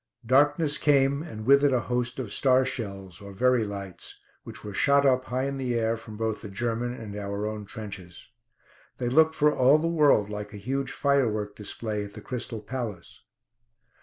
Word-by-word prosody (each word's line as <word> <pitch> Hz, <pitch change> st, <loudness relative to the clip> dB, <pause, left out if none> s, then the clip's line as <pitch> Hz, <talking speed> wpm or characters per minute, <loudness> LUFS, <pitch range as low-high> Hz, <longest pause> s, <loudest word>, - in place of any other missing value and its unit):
Darkness 145 Hz, +4 st, +3 dB
came, 140 Hz, -1 st, +3 dB
and 110 Hz, -10 st, -8 dB
with 140 Hz, +2 st, +6 dB
it 145 Hz, -, +4 dB
a 125 Hz, -2 st, +2 dB
host 125 Hz, 0 st, -2 dB
of 125 Hz, -6 st, -4 dB
star 130 Hz, -1 st, +3 dB
shells, 100 Hz, -6 st, -5 dB
or 100 Hz, 0 st, -10 dB
Verey 125 Hz, +3 st, +3 dB
lights, 100 Hz, -3 st, -8 dB, 0.2 s
which -, -, -10 dB
were 105 Hz, -, -7 dB
shot 140 Hz, +6 st, +3 dB
up 130 Hz, -1 st, +3 dB
high 130 Hz, +1 st, -2 dB
in 140 Hz, 0 st, -2 dB
the 125 Hz, -2 st, -2 dB
air 115 Hz, 0 st, +1 dB
from 110 Hz, -2 st, -10 dB
both 110 Hz, -1 st, -2 dB
the 105 Hz, -, -8 dB
German 120 Hz, +3 st, -2 dB
and 110 Hz, -4 st, -8 dB
our 100 Hz, 0 st, -4 dB
own 105 Hz, -1 st, -5 dB
trenches. 100 Hz, -5 st, -9 dB, 0.7 s
They 120 Hz, -, -1 dB
looked 160 Hz, +4 st, +4 dB
for 150 Hz, 0 st, +3 dB
all 130 Hz, +4 st, +5 dB
the 160 Hz, +2 st, -1 dB
world 150 Hz, -10 st, +4 dB
like 105 Hz, 0 st, -6 dB
a -, -, -7 dB
huge 135 Hz, +6 st, -3 dB
firework 115 Hz, -8 st, 0 dB
display 105 Hz, 0 st, -3 dB
at 100 Hz, 0 st, -10 dB
the 105 Hz, -, -8 dB
Crystal 120 Hz, -1 st, -5 dB
Palace. 110 Hz, -6 st, -6 dB
120 Hz, 190 wpm, -27 LUFS, 105-135 Hz, 0.7 s, with